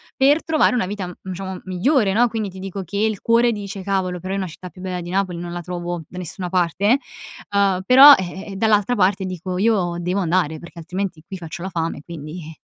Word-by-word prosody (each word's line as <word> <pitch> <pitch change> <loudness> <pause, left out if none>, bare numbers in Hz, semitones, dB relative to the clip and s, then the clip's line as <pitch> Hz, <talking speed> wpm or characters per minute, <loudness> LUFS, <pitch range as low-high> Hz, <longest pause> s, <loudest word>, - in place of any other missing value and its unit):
per 285 +4 +4
trovare 310 -5 +3
una 235 - +1
vita, 195 -1 -4
mhmm, 185 +1 -8
diciamo 190 0 -6
migliore, 195 - +2
no? 240 +3 +4
Quindi 220 -2 -3
ti 190 0 -11
dico 195 0 -5
che 180 - -9
il 215 -1 0
cuore 235 +1 +3
dice: 200 -3 -6
"Cavolo, 185 -2 -1
però 185 +2 -5
io 195 - -1
una 190 - -2
città 180 +2 -10
più 180 - -14
bella 180 -1 -4
di 175 - -7
Napoli 185 -1 -1
non 175 0 -6
la 175 0 -4
trovo 175 -1 -5
da 180 - -11
nessuna 180 +1 -4
parte", 185 - +2 0.5
uhm, 200 -2 +2
però 270 +6 +10
ehm, 190 +1 -5
eh, - - -7
dall'altra 210 +2 +2
parte 190 -2 +2
dico: 185 0 -4
"Io 190 -4 +1
devo 180 +3 -1
andare, 170 -3 +1
perché 170 +1 -12
altrimenti 180 0 -4
qui 190 +2 -7
faccio 170 +1 -8
la 190 - -3
fame, 165 -4 -3
quindi". 160 0 -8
185 Hz, 220 wpm, -21 LUFS, 175-205 Hz, 0.5 s, però